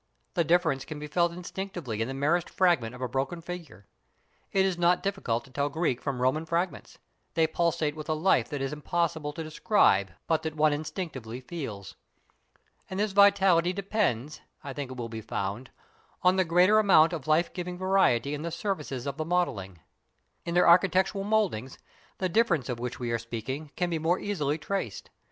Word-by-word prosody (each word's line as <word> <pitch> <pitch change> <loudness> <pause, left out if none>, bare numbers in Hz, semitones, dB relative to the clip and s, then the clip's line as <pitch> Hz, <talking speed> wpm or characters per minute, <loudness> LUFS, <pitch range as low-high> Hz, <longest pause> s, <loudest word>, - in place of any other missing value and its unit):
The 170 - +2
difference 160 -5 +2
can 155 - -7
be 150 - -6
felt 170 +3 +1
instinctively 175 - -5
in 115 - 0
the 135 - -5
merest 155 +5 +1
fragment 140 -11 +2
of 125 - -7
a - - 0
broken 135 +7 -2
figure. 165 - -9 0.7
It 190 -1 +3
is 190 -2 +1
not 175 +1 +2
difficult 195 -13 -1
to 135 - -18
tell 140 +2 -1
Greek 150 -5 -1
from 130 -3 -2
Roman 130 +5 +2
fragments, 170 +3 -2 0.4
they 165 0 +4
pulsate 160 -2 0
with 155 0 -8
a 155 - +2
life 170 +5 +2
that 145 -3 -3
it - - +1
is 135 - -4
impossible 160 0 -1
to 160 - -5
describe 155 - +3 0.2
but 160 -1 +1
that 160 -1 -4
one 155 -1 +3
instinctively 145 - -5
feels. 125 - -7 0.9
And 190 - -4
this 210 0 +1
vitality 190 -3 +5
depends, 185 - -1 0.2
I 140 -2 -6
think 140 -1 -5
it 130 - -8
will 120 -1 -4
be 110 -1 -6
found, 105 +3 -4 0.5
on 180 +1 +5
the 190 -1 +2
greater 180 +6 +5
amount 175 -5 +5
of 155 -4 -5
life 160 +3 +2
giving 180 -1 -5
variety 165 -9 +2
in 150 - -4
the 170 - -3
surfaces 155 - -3
of 140 -1 -4
the 155 - -1
modelling. 100 - -1 0.6
In 170 0 -3
their 180 - +5
architectural 190 +3 +4
mouldings, 200 - 0 0.4
the 185 - 0
difference 180 - +1
of 120 -2 -3
which 125 0 -5
we 120 -2 -2
are 115 - 0
speaking 120 +6 -5
can 180 0 -1
be 165 - 0
more 165 +3 +2
easily 155 -9 -1
traced. 160 - -4
160 Hz, 190 wpm, -28 LUFS, 130-180 Hz, 0.9 s, vitality